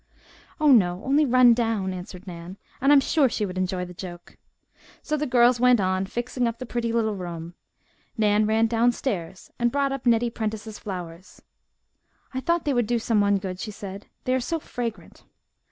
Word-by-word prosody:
"Oh, 305 -2 +5
no, 185 -6 +4
only 285 +2 +3
run 250 -1 +6
down," 225 -5 -1
answered 180 +1 -9
Nan, 175 +1 -9 0.2
"and 275 +2 +4
I'm 290 - +8
sure 275 0 +2
she 215 - -1
would 185 -2 -6
enjoy 185 0 -1
the 180 - -10
joke." 175 -1 -10 0.7
So 305 - -1
the 300 0 -2
girls 245 -1 +4
went 250 -1 +5
on 185 0 0
fixing 240 +2 -2
up 230 0 -3
the 255 - -6
pretty 235 -1 -2
little 225 -2 +1
room. 170 -2 -6 0.6
Nan 210 -1 +3
ran 220 +1 +3
downstairs 225 -6 -1
and 240 0 +2
brought 280 0 +1
up 270 -2 -4
Nettie 235 0 +3
Prentice's 220 -1 -5
flowers. 180 -2 -8 0.9
"I 260 - -2
thought 340 +5 0
they 290 - +1
would 240 -4 +1
do 240 +1 +1
someone 205 -3 +2
good," 185 -2 -5
she 215 - -5
said. 200 -1 -8 0.2
"They 255 - 0
are 260 - +2
so 325 +7 -2
fragrant." 235 -6 -6
225 Hz, 185 wpm, -25 LUFS, 190-245 Hz, 0.9 s, I'm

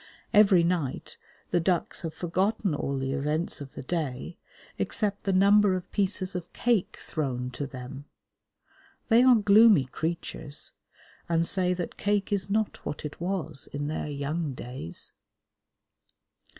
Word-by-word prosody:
Every 195 -4 +6
night 170 -6 -1 0.4
the 175 - +3
ducks 175 0 0
have 165 -2 -5
forgotten 190 +2 0
all 140 -1 -2
the 135 0 -2
events 150 +4 -1
of 140 -1 -8
the - - -7
day, 150 0 -3 0.4
except 205 -2 -1
the 195 - +2
number 200 +1 +5
of 185 -1 -6
pieces 190 -1 0
of 180 -1 -5
cake 235 -6 +1
thrown 125 -5 -3
to 140 +3 -4
them. 130 +2 -8 1.0
They 230 +1 +6
are 255 -1 +7
gloomy 210 - +6
creatures, 155 0 -3 0.6
and 165 0 +2
say 180 0 +1
that 175 -1 -5
cake 205 0 0
is 195 -1 -1
not 215 +1 -1
what 150 - -5
it 150 +2 -7
was 175 -5 -3
in 145 +1 -3
their 155 - -3
young 145 +1 -2
days. 120 -10 -5
170 Hz, 140 wpm, -28 LUFS, 145-195 Hz, 1.0 s, are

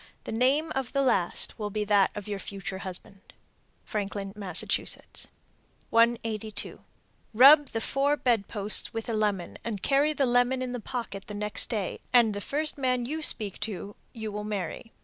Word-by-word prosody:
The - - -6
name 265 +8 +2
of 265 -2 -3
the 275 -1 +2
last 215 -4 0
will 210 -1 -2
be 210 +1 -2
that 205 -2 +4
of 205 -1 -6
your 205 -1 -3
future 195 0 -6
husband. 190 +1 -8 0.5
Franklin, 200 -1 -4
Mass. 195 -5 +1 1.3
182. 225 -2 0 0.5
Rub 285 +5 +8
the 225 - -3
four 280 +4 +1
bed 230 -7 +1
posts 210 +1 -1
with 225 - -3
a 230 - -2
lemon 205 -5 -1
and 210 -4 -4
carry 285 +2 +3
the 280 -2 +1
lemon 245 +1 +2
in 250 - -4
the 245 - -3
pocket 225 -4 -5
the 210 - -6
next 210 0 -1
day, 205 -5 -2
and 235 -4 +5
the 205 - -4
first 295 +5 -2
man 250 -2 +1
you 310 +5 -3
speak 210 -9 +1
to 205 -1 -5 0.2
you 220 -2 -6
will 210 0 -4
marry. 210 +1 -4
220 Hz, 170 wpm, -28 LUFS, 205-255 Hz, 1.3 s, Rub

